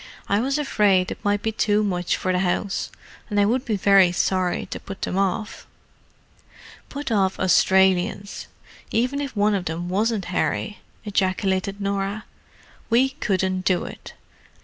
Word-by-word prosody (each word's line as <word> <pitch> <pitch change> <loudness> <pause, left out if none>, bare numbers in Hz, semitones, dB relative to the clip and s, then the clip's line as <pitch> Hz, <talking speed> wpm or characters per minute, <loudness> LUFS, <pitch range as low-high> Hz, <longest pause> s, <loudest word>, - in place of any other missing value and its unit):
"I 200 - +2
was 270 +5 0
afraid 205 -10 +2
it - - -8
might 205 +1 0
be 220 - 0
too 210 -1 +1
much 180 -3 -1
for 185 - -1
the 180 - +1
house; 190 +2 -1 0.4
and 205 -1 0
I 200 - +5
would 250 +5 0
be 220 - 0
very 195 -2 +5
sorry 180 0 0
to - - -4
put 195 -1 -9
them - - -2
off." 195 +3 -2 1.2
"Put 285 -3 -5
off 195 -3 +1
Australians, 190 +2 +2 0.4
even 255 +5 0
if 275 -3 -5
one 210 +1 +2
of 190 -3 -1
them 170 +2 -4
wasn't 210 +1 0
Harry!" 210 +3 -1 0.3
ejaculated 195 0 0
Norah. 200 +1 -2 0.6
"We 245 +3 +4
couldn't 190 - -1
do 185 -1 +1
it! - - -10
200 Hz, 150 wpm, -23 LUFS, 185-215 Hz, 1.2 s, I